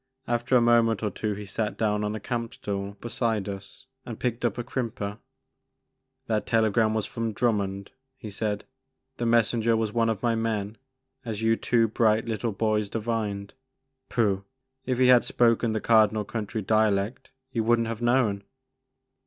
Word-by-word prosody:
After 120 Hz, +2 st, +1 dB
a 125 Hz, -, +6 dB
moment 115 Hz, -2 st, +3 dB
or 105 Hz, -, 0 dB
two 105 Hz, +2 st, -3 dB
he 105 Hz, +1 st, -7 dB
sat 105 Hz, +2 st, -3 dB
down 105 Hz, -1 st, +1 dB
on 105 Hz, +1 st, -2 dB
a -, -, -4 dB
camp 115 Hz, +3 st, -4 dB
stool 100 Hz, -4 st, -4 dB
beside 115 Hz, -3 st, -1 dB
us 100 Hz, -1 st, -8 dB, 0.2 s
and -, -, -8 dB
picked 125 Hz, -1 st, -2 dB
up 120 Hz, -3 st, 0 dB
a 120 Hz, -, -2 dB
crimper. 115 Hz, -4 st, -4 dB, 1.1 s
That 110 Hz, -2 st, -1 dB
telegram 110 Hz, -1 st, +2 dB
was 110 Hz, -2 st, 0 dB
from 115 Hz, 0 st, -3 dB
Drummond," 100 Hz, -4 st, -1 dB, 0.3 s
he 110 Hz, -5 st, -8 dB
said; 105 Hz, 0 st, -2 dB
•* -, -, -34 dB, 0.5 s
the 120 Hz, -, -1 dB
messenger 115 Hz, 0 st, +3 dB
was 110 Hz, -2 st, -1 dB
one 115 Hz, -1 st, +2 dB
of 110 Hz, -1 st, -2 dB
my 120 Hz, -1 st, +2 dB
men 110 Hz, -2 st, -2 dB, 0.4 s
as 110 Hz, -3 st, -4 dB
you 115 Hz, 0 st, +4 dB
two 115 Hz, 0 st, +2 dB
bright 110 Hz, 0 st, +2 dB
little 115 Hz, 0 st, -2 dB
boys 105 Hz, 0 st, 0 dB
divined. 105 Hz, -3 st, -3 dB, 0.6 s
Pooh! 100 Hz, -5 st, +1 dB, 0.4 s
If 130 Hz, -2 st, 0 dB
he 130 Hz, -, +4 dB
had 125 Hz, -1 st, +7 dB
spoken 115 Hz, -1 st, +2 dB
the 110 Hz, -, 0 dB
Cardinal 110 Hz, -1 st, +3 dB
County 110 Hz, 0 st, -4 dB
dialect 110 Hz, +1 st, +1 dB, 0.2 s
you 115 Hz, -3 st, 0 dB
would 120 Hz, +1 st, +4 dB
n't -, -, 0 dB
have 115 Hz, 0 st, -4 dB
known." 120 Hz, -5 st, +2 dB
110 Hz, 170 wpm, -26 LUFS, 105-115 Hz, 1.1 s, had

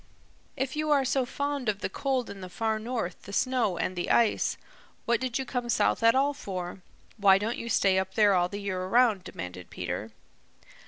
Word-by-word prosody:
"If 265 Hz, +1 st, -2 dB
you 305 Hz, 0 st, -1 dB
are 280 Hz, -2 st, +4 dB
so 260 Hz, -1 st, +1 dB
fond 285 Hz, -3 st, -2 dB
of 205 Hz, -1 st, -2 dB
the -, -, 0 dB
cold 260 Hz, +4 st, -2 dB
in 195 Hz, -, -9 dB
the 185 Hz, -, -7 dB
Far 220 Hz, +3 st, -1 dB
North, 220 Hz, -6 st, -4 dB
the 200 Hz, -, -10 dB
snow 235 Hz, -4 st, +1 dB
and 185 Hz, -, -2 dB
the 175 Hz, -, -3 dB
ice, 230 Hz, -2 st, +2 dB, 0.5 s
what 235 Hz, -1 st, +2 dB
did 255 Hz, -2 st, -1 dB
you 265 Hz, -, -3 dB
come 245 Hz, -2 st, -3 dB
south -, -, +2 dB
at 230 Hz, +1 st, +5 dB
all 280 Hz, +2 st, +3 dB
for? 185 Hz, -8 st, -6 dB, 0.4 s
Why 195 Hz, -2 st, +6 dB
don't 220 Hz, +4 st, -2 dB
you 235 Hz, -, -5 dB
stay 195 Hz, -3 st, +3 dB
up 190 Hz, 0 st, -4 dB
there 205 Hz, -2 st, +5 dB
all 180 Hz, -1 st, +2 dB
the 200 Hz, -, -5 dB
year 195 Hz, -2 st, -3 dB
around?" 220 Hz, -2 st, +3 dB
demanded 90 Hz, -, -8 dB
Peter. 90 Hz, +4 st, -4 dB
220 Hz, 205 wpm, -28 LUFS, 190-255 Hz, 0.5 s, Why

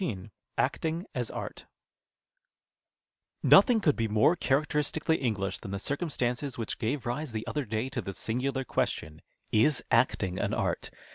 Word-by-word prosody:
99 105 Hz, -, -4 dB, 0.3 s
ACTING 165 Hz, +3 st, 0 dB
AS -, -, -2 dB
ART -, -, -6 dB, 1.8 s
Nothing 245 Hz, -4 st, +7 dB
could 155 Hz, -8 st, +3 dB
be 115 Hz, -1 st, 0 dB
more 110 Hz, +10 st, +4 dB
characteristically 150 Hz, +1 st, +1 dB
En^lisli 100 Hz, -6 st, -1 dB
than 105 Hz, -, -8 dB
the 100 Hz, -, -2 dB
circumstances 135 Hz, -, -1 dB
which 115 Hz, -2 st, -4 dB
gave 125 Hz, +4 st, -1 dB
rise 125 Hz, +2 st, -3 dB
the 110 Hz, 0 st, -3 dB
other 145 Hz, -2 st, -2 dB
day 110 Hz, +3 st, -2 dB
to 130 Hz, -2 st, -3 dB
the 95 Hz, -1 st, -6 dB
singidar 130 Hz, +3 st, -1 dB
question, 80 Hz, -8 st, -2 dB, 0.2 s
" -, -, -44 dB
Is 120 Hz, +3 st, +3 dB
acting 105 Hz, -6 st, +2 dB
an -, -, 0 dB
art -, -, -1 dB
125 Hz, 150 wpm, -29 LUFS, 110-150 Hz, 1.8 s, Nothing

